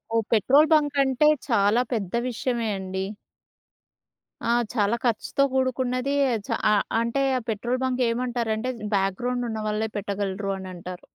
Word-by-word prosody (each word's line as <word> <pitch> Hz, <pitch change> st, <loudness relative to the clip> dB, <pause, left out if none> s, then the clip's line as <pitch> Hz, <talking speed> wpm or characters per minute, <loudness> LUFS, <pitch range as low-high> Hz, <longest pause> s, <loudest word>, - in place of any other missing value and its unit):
ఓహ్! 225 Hz, -, +3 dB
Petrol 275 Hz, +8 st, +5 dB
bunk 295 Hz, -2 st, +3 dB
అంటే 265 Hz, +2 st, +3 dB, 0.2 s
చాలా 225 Hz, -1 st, +3 dB
పెద్ద 200 Hz, -6 st, -3 dB, 0.2 s
విషయమే 235 Hz, -1 st, -2 dB
అండి. 190 Hz, 0 st, -4 dB, 1.4 s
ఆ! -, -, +4 dB, 0.2 s
చాలా 210 Hz, -1 st, +2 dB
ఖర్చుతో 240 Hz, +4 st, +1 dB
కూడుకున్నది. 260 Hz, +1 st, 0 dB, 0.3 s
చా -, -, 0 dB, 0.2 s
అ -, -, +5 dB, 0.3 s
అంటే 235 Hz, +4 st, 0 dB, 0.2 s
ఆ -, -, 0 dB
పెట్రోల్ 240 Hz, +4 st, -1 dB
బంక్ 255 Hz, -1 st, 0 dB
ఏమంటారంటే 235 Hz, -1 st, -1 dB, 0.3 s
బ్యాక్‌గ్రౌండ్ 240 Hz, +6 st, -1 dB
ఉన్నవాళ్ళే 215 Hz, 0 st, -2 dB
పెట్టగలరు 200 Hz, 0 st, -2 dB
అనంటారు. 180 Hz, -1 st, -8 dB
230 Hz, 125 wpm, -25 LUFS, 200-255 Hz, 1.4 s, పెట్రోల్